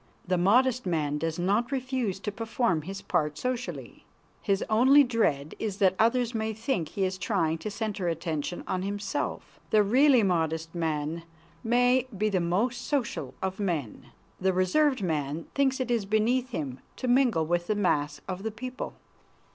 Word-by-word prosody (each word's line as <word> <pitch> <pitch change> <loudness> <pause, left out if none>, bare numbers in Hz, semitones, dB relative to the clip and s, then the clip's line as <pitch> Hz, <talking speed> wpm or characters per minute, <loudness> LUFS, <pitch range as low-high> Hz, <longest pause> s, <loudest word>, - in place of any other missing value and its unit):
The 185 - +2
modest 240 +6 +3
man 150 -4 0
does 165 +1 -2
not 205 +8 +1
refuse 255 -7 -2
to 210 - -3
perform 225 -5 0
his 195 +5 -7
part 150 -1 0
socially. 250 -1 -4 0.4
His 200 -1 +1
only 260 +6 +6
dread 155 - 0
is 210 -3 -3
that 190 -2 +4
others 235 +1 +2
may 220 -1 -1
think 220 - -2
he 195 - -2
is 185 0 -3
trying 165 -7 0
to 215 - -4
center 205 -3 -3
attention 165 0 -3
on 185 - -2
himself. 205 +5 -4
The 215 -1 +5
really 255 +3 +5
modest 165 -3 0
man 160 -1 -2 0.4
may 245 +2 +3
be 215 +2 +1
the 195 -3 +1
most 195 +9 0
social 280 -5 -2
of 190 +1 -2
men. 165 - -3 0.3
The 190 0 +2
reserved 230 +8 +2
man 155 -2 -2
thinks 270 -1 +1
it 250 -2 -1
is 230 -4 +1
beneath 235 +5 +1
him 140 - -4 0.2
to 255 - -4
mingle 245 -10 +3
with 175 +1 0
the 215 - +1
mass 150 -7 0
of 185 0 -4
the 220 - -2
people. 250 +4 -6
200 Hz, 165 wpm, -28 LUFS, 170-240 Hz, 0.4 s, only